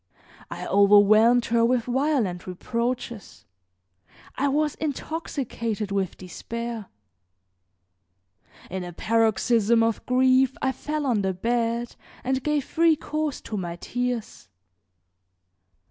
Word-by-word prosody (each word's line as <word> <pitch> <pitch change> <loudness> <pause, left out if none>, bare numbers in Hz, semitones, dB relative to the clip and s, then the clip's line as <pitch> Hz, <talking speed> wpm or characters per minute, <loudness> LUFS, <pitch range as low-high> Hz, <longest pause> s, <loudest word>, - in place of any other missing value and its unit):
I - - -6
overwhelmed 210 +4 +5
her 230 0 +2
with 240 0 +2
violent 245 - 0
reproaches; 235 +4 -4 0.9
I 285 - 0
was 300 +1 +1
intoxicated 265 -8 -4
with 195 -2 -1
despair. 230 +4 -6 1.8
In 185 0 -3
a 175 0 -7
paroxysm 225 +2 +2
of 225 -1 0
grief 260 +1 +3
I 265 - +1
fell 300 +2 -4
on 235 -6 +1
the 190 -1 0
bed 235 +3 -1 0.3
and 265 +1 0
gave 300 0 0
free 330 -1 +3
course 305 -1 -3
to 215 - -5
my 175 -3 -4
tears. 245 - -4
235 Hz, 105 wpm, -25 LUFS, 210-265 Hz, 1.8 s, overwhelmed